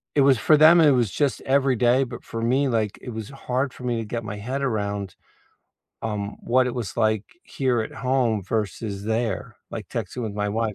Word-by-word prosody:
it 145 - +5
was 135 -2 +5
for 150 +7 +4
them 160 +3 +8
it 150 - +6
was 120 -6 +2
just 140 -6 0
every 135 -1 +2
day, 125 +3 +3
but 120 -2 -7
for 115 - -5
me, 130 +4 +2
like, 110 -4 -1
it - - -8
was 110 -3 -6
hard 130 0 -2
for - - -12
me 120 -1 0
to 115 - -4
get 115 +2 -4
my 105 -1 -5
head 125 +7 -3
around, 100 -6 -2 0.9
um, 105 -2 -3
what 130 +2 +2
it 125 - -3
was 115 -5 -4
like 110 -2 +2 0.2
here 130 -4 0
at 110 - -4
home 125 -5 +1
versus 105 0 -3
there, 110 -3 -2 0.2
like - - -6
texting 125 - -4
with 110 -2 -3
my 105 0 -1
wife 110 0 -1
115 Hz, 210 wpm, -24 LUFS, 105-130 Hz, 0.9 s, them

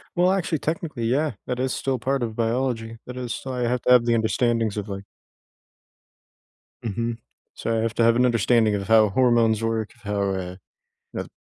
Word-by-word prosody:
Well, 180 +1 +4
actually 170 -5 0
technically, 155 -6 -3
yeah, 140 +6 +1 0.2
that 125 0 -2
is 130 0 0
still 135 -1 -1
part 135 +3 -1
of 115 -2 -3
biology, 115 -1 -1
that 125 0 -7
is 120 -2 -4
why 125 -2 -2
I - - 0
have 125 0 0
to - - +2
have 120 -1 +5
the 120 - +2
understandings 115 -1 +1
of 105 0 -3
like 100 0 -6 1.8
Mhm, 115 +1 -2 0.4
so, 115 0 -2
I 110 - +1
have 115 0 -1
to 115 - +2
have 115 0 +5
an 125 - +4
understanding 115 -2 +3
of 100 -1 -4
how 110 -2 +5
hormones 115 -2 +3
work, 115 -1 -1
of 120 - -25
how, 105 -1 -2
uh, 90 -1 -4 0.6
the - - -4
115 Hz, 195 wpm, -24 LUFS, 110-125 Hz, 1.8 s, have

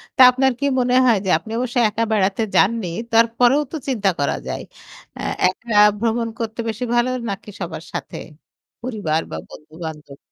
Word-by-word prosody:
তা 260 - +4
আপনার 265 +1 +2
কি 280 - -1
মনে 250 0 +2
হয় 235 -4 +5
যে - - -1
আপনি 220 - -11
অবশ্যই 245 -1 0
একা 225 +2 -1
বেড়াতে 200 0 +1
যাননি। 220 -1 +3 0.3
তারপরেও 235 +4 +4
তো 320 - -3
চিন্তা 210 -7 +1
করা 140 - +1
যায়। - - -4 0.5
অ্যা - - -7 0.2
একা 210 +5 -3 0.2
ভ্রমণ 230 +1 0
করতে 225 0 -4
বেশি 225 +3 -4
ভালো 240 +1 +2 0.2
নাকি 200 +1 -6
সবার 165 -3 -5
সাথে - - -5 0.6
পরিবার 205 -10 -1
বা 80 - -4
বন্ধু-বান্ধব? 155 -2 -9
225 Hz, 165 wpm, -20 LUFS, 185-240 Hz, 0.6 s, হয়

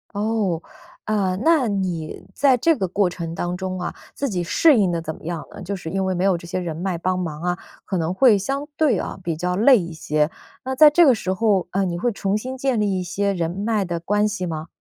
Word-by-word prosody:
哦， 205 -5 0 0.4
呃， 200 -4 0
那 320 -5 +4
你 185 -6 -3
在 275 -2 +4
这 325 +7 +3
个 190 - -1
过 190 +1 +1
程 170 -2 -5
当 175 +1 -3
中 185 0 -4
啊， 175 - -3 0.2
自 280 - -2
己 180 -5 -2
适 250 - +4
应 195 -4 +3
得 170 -1 -2
怎 160 -1 -5
么 - - -17
样 170 -2 -4
呢？ - - -10
就 200 +3 -3
是 175 -4 -7
因 190 +2 -1
为 190 - 0
没 180 0 -1
有 190 -2 +3
这 170 - -11
些 185 +1 -2
人 170 -3 -4
脉 180 0 -2
帮 185 +1 0
忙 160 -4 -4
啊， 180 0 -1 0.3
可 190 - -3
能 165 +1 -1
会 230 +1 +5
相 275 +9 -3
对 275 - +3
啊 - - -5
比 170 -2 -2
较 180 +3 -2
累 235 +5 +6
一 175 -2 -5
些。 155 -1 0 0.3
那 265 +1 -3
在 300 +3 +8
这 345 +3 +6
个 265 -4 +6
时 185 -3 -2
候， 195 -2 +1
嗯， 190 0 0
你 170 - -3
会 240 +7 0
重 200 -1 -1
新 255 +4 -5
建 265 -3 0
立 200 -3 +1
一 - - -2
些 200 +3 -1
人 170 -3 -1
脉 205 +4 -1
的 175 -2 -3
关 205 +5 +1
系 205 -3 -3
吗？ 160 -1 -5
190 Hz, 265 characters per minute, -22 LUFS, 175-215 Hz, 0.4 s, 在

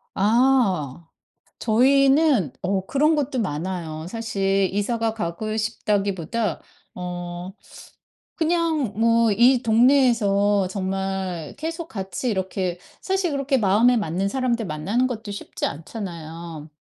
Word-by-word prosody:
아. 200 - +2 0.5
저희는 270 - +3
어 190 0 -1
그런 300 +3 +2
것도 285 -3 -1
많아요. 165 -3 -4
사실 195 -3 0
이사가 225 +2 -1
가고 215 +2 -3
싶다기보다 205 -3 -1 0.4
어 175 0 -6 0.8
그냥 320 - 0
뭐 230 0 +4
이 245 +4 +4
동네에서 220 -5 +3
정말 190 -3 -3
계속 325 +2 -5
같이 195 +3 -4
이렇게 190 -2 -2 0.2
사실 380 -3 0
그렇게 275 -1 +1
마음에 225 +4 +4
맞는 195 -1 -1
사람들 240 -2 -1
만나는 195 +11 0
것도 220 -4 -5
쉽지 200 - -6
않잖아요. 165 -2 -7
205 Hz, 235 characters per minute, -23 LUFS, 185-250 Hz, 0.8 s, 뭐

